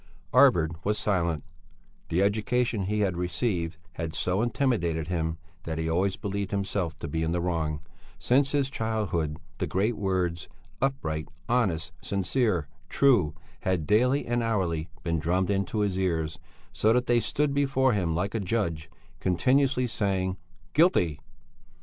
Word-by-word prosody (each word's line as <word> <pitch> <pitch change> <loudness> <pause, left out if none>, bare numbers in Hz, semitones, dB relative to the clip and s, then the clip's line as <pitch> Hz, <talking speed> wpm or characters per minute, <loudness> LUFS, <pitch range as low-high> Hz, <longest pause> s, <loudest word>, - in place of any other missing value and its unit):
Arvid 80 -2 +5
was 105 +1 +1
silent; 85 -7 0 0.7
the 90 +4 +2
education 110 +1 +1
he 105 +2 0
had 95 -3 +1
received 90 -1 -1
had 80 -2 -5
so 90 +6 +1
intimidated 100 - 0
him 80 -2 -1 0.2
that 80 -1 -4
he 80 0 -1
always 90 +4 +1
believed 100 -1 -3
himself 100 -5 -2
to 80 - -5
be 80 +2 -2
in 80 +1 0
the 90 - 0
wrong; 80 -4 -1 0.4
since 135 +2 +2
his 140 -2 +1
childhood 105 - -1 0.2
the 90 - 0
great 100 +8 +1
words 90 -4 -1 0.3
"upright, 80 - -1 0.2
honest, 95 -10 +1
sincere, 100 - 0 0.2
true," 105 - +3 0.2
had 90 -4 0
daily 125 - +3
and 120 0 0
hourly 90 -8 -1
been 85 -1 0
drummed 90 +5 +1
into 100 +2 0
his 100 -2 0
ears, 80 -4 -1 0.3
so 110 - +3
that 125 +1 +2
they 120 -1 +3
stood 145 +4 0
before 135 -2 +2
him 90 -5 0
like 95 +4 -1
a 115 - 0
judge, 90 -6 -1 0.3
continuously 125 +8 +2
saying: 95 -5 -1 0.4
"Guilty...." 115 - +3
95 Hz, 145 wpm, -27 LUFS, 85-115 Hz, 0.7 s, Arvid